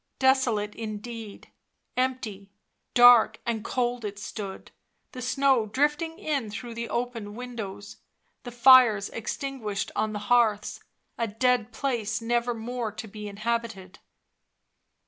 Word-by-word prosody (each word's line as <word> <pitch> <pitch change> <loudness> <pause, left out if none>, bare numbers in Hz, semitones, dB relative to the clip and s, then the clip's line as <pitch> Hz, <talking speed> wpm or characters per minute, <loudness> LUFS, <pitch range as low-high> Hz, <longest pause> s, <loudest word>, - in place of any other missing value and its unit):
Desolate 250 -6 +2
indeed; 220 0 -7 0.4
empty, 250 -6 -2 0.5
dark 240 -3 +7
and 225 -2 -2
cold 245 -1 -1
it 205 -1 -5
stood, 200 -1 -7 0.4
the 255 - -8
snow 260 -2 +2
drifting 295 +7 0
in 280 -8 -2
through 235 +3 -7
the 235 0 -5
open 230 -3 -3
windows, 220 -5 -7 0.4
the 245 - -8
fires 240 -4 +6
extinguished 225 -3 -4
on 215 - 0
the 210 - -4 0.2
hearths, 215 -4 +2 0.4
a 230 - +1
dead 245 +1 +1
place 235 -3 -2
never 235 +1 0
more 230 0 -4
to 220 +1 -8
be 210 0 -8
inhabited. 210 -2 -4
230 Hz, 120 wpm, -27 LUFS, 210-250 Hz, 0.5 s, dark